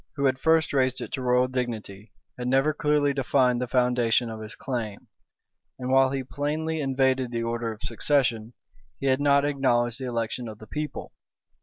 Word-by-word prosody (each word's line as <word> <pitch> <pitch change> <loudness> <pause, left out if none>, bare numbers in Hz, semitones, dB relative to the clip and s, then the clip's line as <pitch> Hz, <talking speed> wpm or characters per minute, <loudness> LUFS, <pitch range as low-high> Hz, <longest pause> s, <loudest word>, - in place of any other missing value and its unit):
who 140 -1 0
had 130 -1 +2
first 160 0 +3
raised 130 -2 +1
it - - -6
to 135 - -3
royal 125 0 +3
dignity, 115 -5 -5 0.2
had 125 0 -5
never 135 +4 +3
clearly 150 -1 +2
defined 130 -2 +2
the 125 - -1
foundation 125 -2 +2
of 110 - -7
his 110 0 -8
claim; 115 -6 -4 0.7
and 130 0 -4
while 135 0 +5
he 135 0 -2
plainly 155 +4 -2
invaded 130 -2 +1
the 115 -1 -2
order 115 0 -2
of 110 -1 -10
succession, 120 -2 0 0.5
he - - -4
had 130 +1 +2
not 140 0 +4
acknowledged 125 -4 +1
the 130 - -4
election 115 0 -3
of 110 -1 -8
the 110 - -12
people. 150 +7 -5
130 Hz, 180 wpm, -26 LUFS, 120-140 Hz, 0.7 s, while